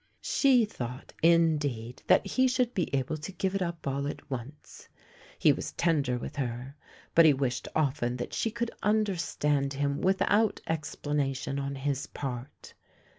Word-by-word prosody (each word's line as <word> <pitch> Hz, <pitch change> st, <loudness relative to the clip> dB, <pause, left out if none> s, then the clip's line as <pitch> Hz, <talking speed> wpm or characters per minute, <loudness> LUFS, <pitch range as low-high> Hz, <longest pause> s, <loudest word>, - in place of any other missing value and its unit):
She 255 Hz, -5 st, +4 dB
thought 125 Hz, -, -7 dB
indeed 150 Hz, -8 st, +2 dB
that -, -, +5 dB
he 260 Hz, 0 st, +2 dB
should 250 Hz, -1 st, +1 dB
be 180 Hz, -, 0 dB
able 140 Hz, +3 st, -1 dB
to 155 Hz, +5 st, -7 dB
give 190 Hz, 0 st, -2 dB
it 195 Hz, -, -1 dB
up 170 Hz, -2 st, -3 dB
all 140 Hz, +1 st, -1 dB
at 145 Hz, -, -7 dB
once. 130 Hz, +4 st, -8 dB, 0.5 s
He -, -, +5 dB
was -, -, -5 dB
tender 145 Hz, -7 st, +1 dB
with 120 Hz, -, -7 dB
her, 125 Hz, +1 st, -4 dB, 0.4 s
but 165 Hz, -, +7 dB
he 150 Hz, -3 st, +6 dB
wished 130 Hz, -2 st, -2 dB
often 135 Hz, -5 st, 0 dB
that 120 Hz, -, -5 dB
she 225 Hz, -, 0 dB
could 235 Hz, +1 st, -3 dB
understand 170 Hz, -9 st, +1 dB
him 140 Hz, +1 st, -1 dB
without 205 Hz, +3 st, +2 dB
explanation 145 Hz, -3 st, -2 dB
on 140 Hz, 0 st, -3 dB
his 140 Hz, 0 st, -2 dB
part. 130 Hz, -1 st, -7 dB
145 Hz, 155 wpm, -29 LUFS, 135-180 Hz, 0.5 s, but